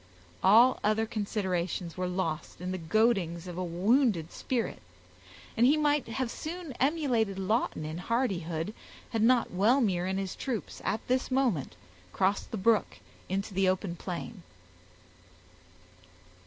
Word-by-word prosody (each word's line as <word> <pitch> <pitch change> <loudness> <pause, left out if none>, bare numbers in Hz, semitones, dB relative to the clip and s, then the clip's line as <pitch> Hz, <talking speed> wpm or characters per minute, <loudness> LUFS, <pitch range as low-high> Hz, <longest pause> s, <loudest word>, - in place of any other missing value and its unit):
All 230 +7 +6
other 215 +1 +2
considerations 190 -5 -2
were 185 0 -2
lost 180 -4 -3
in 180 +1 -4
the 185 - -3
goadings 175 -2 +1
of 180 -2 -7
a 185 - -2
wounded 185 - +2
spirit, 245 -3 -3 0.7
and 230 - +2
he 280 +5 +5
might 295 -2 +2
have 240 +1 -2
soon 335 -1 -6
emulated 255 - +1
Lawton 195 -5 0
in 155 +2 -5
hardihood, 180 -6 -1 0.4
had 225 - 0
not 240 +1 +4
Wellmere 195 -2 +2
and 190 0 -1
his 195 -1 -3
troops 245 -6 -4
at 220 - -2
this 255 +1 +1
moment 245 - 0 0.4
crossed 195 +2 +1
the 225 - -4
brook 215 +3 +2 0.3
into 195 +2 -2
the 190 0 +3
open 185 -1 -1
plain. 180 +3 -6
205 Hz, 135 wpm, -29 LUFS, 180-240 Hz, 0.7 s, All